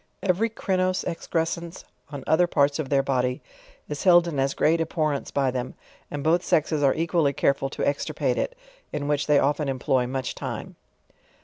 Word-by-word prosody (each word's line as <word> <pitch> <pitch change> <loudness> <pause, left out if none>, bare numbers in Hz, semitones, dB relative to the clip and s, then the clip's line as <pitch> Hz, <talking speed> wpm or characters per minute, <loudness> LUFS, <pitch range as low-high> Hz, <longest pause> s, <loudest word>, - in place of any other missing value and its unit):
Every 195 +4 +2
crinose 185 -4 -1
exerescense 170 +1 -3 0.3
on 140 -3 -7
other 175 +3 +3
parts 145 -2 +2
of 145 -4 -3
their 140 -1 +3
body 125 0 0 0.5
is 145 -1 -5
held 175 -2 +6
in 150 -5 -3
as 135 0 0
great 165 +2 +2
abhorrence 155 -3 -1
by 135 -2 +1
them, 125 0 -4 0.3
and 145 -1 -5
both 170 +3 +3
sexes 155 -1 +1
are 140 -2 +3
equally 165 -3 +1
careful 135 0 +1
to - - -2
extirpate 145 - -1
it, - - -3 0.3
in 145 -1 -3
which 145 -1 0
they 150 -1 +5
often 145 +1 +1
employ 130 -1 0
much 130 0 -3
tim'e. - - -6
150 Hz, 175 wpm, -25 LUFS, 140-170 Hz, 0.5 s, held